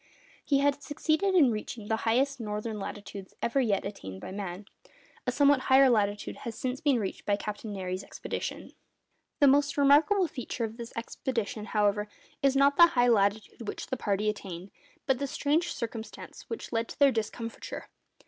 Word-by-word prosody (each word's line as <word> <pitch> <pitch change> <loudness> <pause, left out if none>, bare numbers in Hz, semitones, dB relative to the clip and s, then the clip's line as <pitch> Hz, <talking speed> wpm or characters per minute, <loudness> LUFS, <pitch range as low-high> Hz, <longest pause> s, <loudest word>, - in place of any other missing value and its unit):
He 275 -2 +2
had 285 0 +2
succeeded 315 +6 0
in 285 -9 +6
reaching 215 0 -5
the 220 - +1
highest 270 +4 +2
northern 210 0 -4
latitudes 200 -1 -7
ever 270 +4 +1
yet 210 -6 +1
attained 95 - -7
by - - -8
man. 195 0 -5 0.6
(A - - +3
somewhat 285 +1 +4
higher 265 0 +7
latitude 205 -2 0
has 230 -2 -6
since 255 0 -3
been 285 -5 +3
reached 200 -4 -4
by 205 - +2
Captain 210 +1 -5
Nares's 185 -1 -4
expedition.) - - -5 0.7
The 285 - +8
most 285 +1 +3
remarkable 305 +7 +5
feature 250 -4 -5
of 225 0 -4
this 235 -1 -7
expedition, 230 -2 -3
however, 210 -1 +1 0.3
is 275 -1 +3
not 280 +1 +4
the 340 - +9
high 245 -6 +3
latitude 210 +1 +1
which - - -4
the - - -3
party 210 -3 -1
attained, 195 -3 -4 0.3
but 265 -2 +1
the 280 - -1
strange 305 +6 0
circumstance 230 -3 -7
which 455 - -6
led 230 0 0
to - - -9
their 280 -1 +6
discomfiture. 230 0 -5
235 Hz, 170 wpm, -29 LUFS, 210-275 Hz, 0.7 s, the